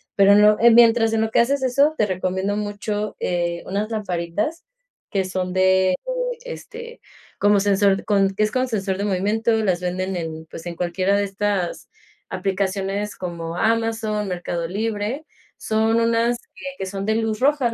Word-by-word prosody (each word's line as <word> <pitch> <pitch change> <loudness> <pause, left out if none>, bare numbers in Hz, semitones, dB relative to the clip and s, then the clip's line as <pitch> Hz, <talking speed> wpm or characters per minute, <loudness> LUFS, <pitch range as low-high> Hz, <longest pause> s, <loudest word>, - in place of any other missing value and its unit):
pero 200 0 +6
no, 210 0 +6
eh, 235 +1 +7
mientras 230 -1 +5
en 220 - +2
lo 220 0 -1
que - - +3
haces 270 +3 +2
eso 280 +5 +3
te 215 - +3
recomiendo 190 +1 -2
mucho, 210 0 -3
eh, 170 -1 -1
unas 205 +3 -2
lamparitas 205 - -3 0.5
que 195 -3 0
son 185 -1 -3
de, 185 0 +3
eh, - - -1 0.5
este, 475 -1 -9 0.4
como 205 0 +4
sensor 195 0 +2
con 195 -2 +2
que 215 - +1
es 215 - 0
con 255 +2 0
sensor 195 -4 -2
de 205 - -1
movimiento. 210 +4 0
Las 185 -3 0
venden 185 +1 -2
en, 160 -2 -5
pues, 165 +2 -10
en 170 - -5
cualquiera 180 +3 0
de 205 - +1
estas 200 -2 -2 0.4
aplicaciones 195 +2 -2
como 170 -1 -5
Amazon, 225 -1 0
Mercado 175 -2 -3
Libre, 220 - -3 0.3
son 220 +1 +1
unas, 230 +1 +2 0.4
que 190 - -4
son 195 +1 -5
de 220 - +2
luz 220 -1 -1
roja. 270 -3 +2
205 Hz, 165 wpm, -22 LUFS, 185-225 Hz, 0.5 s, eh